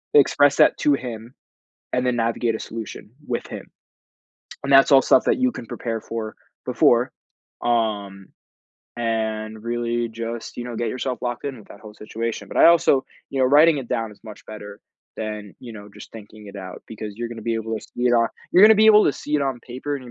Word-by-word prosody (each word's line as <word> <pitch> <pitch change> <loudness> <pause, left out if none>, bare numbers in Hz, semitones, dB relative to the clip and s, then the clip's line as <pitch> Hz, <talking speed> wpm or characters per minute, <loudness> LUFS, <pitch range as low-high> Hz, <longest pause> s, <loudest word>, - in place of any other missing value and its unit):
express 145 0 +5
that - - +5
to 145 - +2
him, 120 -3 -5 0.6
and 125 0 0
then 125 - +1
navigate 115 0 0
a 110 - -5
solution 110 -1 -8 0.2
with 120 - -3
him, - - -8 1.0
and 140 - 0
that's 135 +1 +7
all 135 -2 +8
stuff 130 - +4
that - - +2
you 255 -1 +1
can - - -8
prepare 115 -2 -4
for 110 -1 -6 0.3
before, 125 +2 +3 0.5
um, 105 -5 -1 0.7
and 110 -2 -3
really 120 0 -2
just, 115 0 -6
you 120 - -5
know, 120 -2 -6
get 115 0 -2
yourself 130 +1 -3
locked 120 0 -4
in 135 -4 -4
with 105 - -16
that 100 - -13
whole 105 -1 -12
situation. 110 0 -5
But - - -8
I - - +7
also, 155 -5 +4 0.2
you 135 - -4
know, 130 - +4
writing 150 +4 +5
it 135 -4 -5
down 115 -2 -3
is 105 - -20
much 105 -2 -12
better 105 -1 -10 0.3
than, 105 -2 -6
you 120 -3 -10
know, 105 -1 -11
just - - -13
thinking 105 -1 -13
it 100 0 -10
out 95 -1 -9
because 110 -2 -7
you're 120 0 -4
gonna 115 -1 -8
be 115 +1 -1
able 110 0 -3
to 110 - -8
see 125 - -3
it 120 - +3
on 115 -1 +3 0.2
you're 185 - +5
gonna 220 +1 +9
be 215 +1 +4
able 215 -1 +7
to - - +2
see 150 - -5
it 145 - +2
on 135 -3 -2
paper 130 +5 -5
and 135 - -7
you're 120 - -11
115 Hz, 220 wpm, -22 LUFS, 110-130 Hz, 1.0 s, gonna